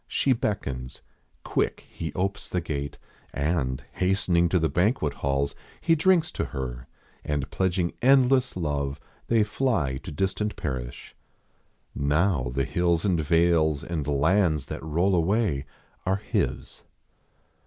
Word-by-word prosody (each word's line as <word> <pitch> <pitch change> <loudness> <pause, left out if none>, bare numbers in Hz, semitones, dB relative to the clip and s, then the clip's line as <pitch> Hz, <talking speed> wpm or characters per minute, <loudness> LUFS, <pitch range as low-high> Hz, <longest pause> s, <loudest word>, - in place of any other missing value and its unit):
She 135 - +2
beckons. 70 - -3 0.4
Quick - - -1
he 80 - -6
opes 95 +2 -2
The 90 - 0
gates, 70 -4 -4 0.4
and, 70 -3 -1
hastening 90 -2 +2
to 90 - +3
the 80 -2 +2
banquet 90 - +1
halls, 70 0 -1 0.3
He 165 - +3
drinks 165 0 +3
to - - -2
her, 60 -1 -5 0.4
and, 70 -2 -2
pledging 90 -2 0
endless 130 -2 +4
love, 70 -4 -2 0.3
They 115 -2 +4
fly 105 - 0
to 80 +5 -8
distant 95 +6 -1
parish. 60 -3 -5 0.8
Now 75 -1 +1
the 70 +1 0
hills 85 +3 +1
And 90 -5 +2
vales 80 -2 +3
and 80 -5 -3
lands 80 +1 +2
that - - -6
roll 85 +5 +1
away 85 -5 +1 0.4
are 95 +1 +1
his. 105 - -2
85 Hz, 130 wpm, -26 LUFS, 70-95 Hz, 0.8 s, endless